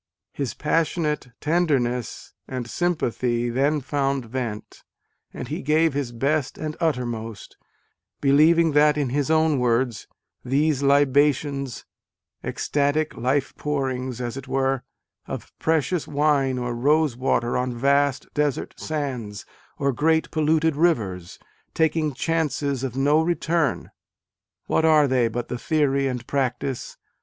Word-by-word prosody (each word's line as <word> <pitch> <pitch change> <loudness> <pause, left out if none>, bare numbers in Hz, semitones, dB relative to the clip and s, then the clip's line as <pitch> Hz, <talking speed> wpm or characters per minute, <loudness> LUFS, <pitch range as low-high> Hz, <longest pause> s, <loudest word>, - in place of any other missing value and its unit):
His 140 -4 -3
passionate 150 -1 0
tender 160 -2 +2
ness 120 -1 -4
and 125 -2 -4
sympathy 120 -7 -1
then 140 +4 +1
found 135 -1 -1
vent: 115 -3 -5 0.5
and - - -7
he - - -4
gave 155 +1 +2
his 140 -4 -2
best 140 +4 -1
and 155 -1 -4
uttermost: 120 - -3 0.6
believing 155 +4 +4
that 150 0 +4
(in 140 -4 0
his 145 +3 -1
own 160 -3 +3
words) 120 -1 0 0.2
" - - -54
these 145 0 +2
libations, 140 -1 +2 0.6
extatic 145 +2 0
life 130 +3 0
pourings, 130 -4 -2
as 120 -1 -4
it 135 -1 -8
were, 135 0 0 0.5
of - - -7
precious 160 +1 0
wine 140 -3 +1
or 120 -1 -2
rose 145 +2 +2
water 120 -1 0
on 125 0 0
vast 140 +1 +2
desert 145 -3 -1
sands 130 -10 -4 0.3
or 140 -1 0
great 160 +4 +1
polluted 160 0 +2
rivers, 105 - 0 0.4
taking 160 -1 +1
chances 145 -4 -1
of 130 -1 -4
no 145 +3 +3
return, 165 -2 0 0.7
what - - +1
are 155 -2 +5
they 125 -3 +2
but 120 +1 -4
the 125 - -4
theory 140 -3 +1
and 125 -2 -4
practice 135 -1 -2
140 Hz, 130 wpm, -24 LUFS, 125-155 Hz, 0.7 s, are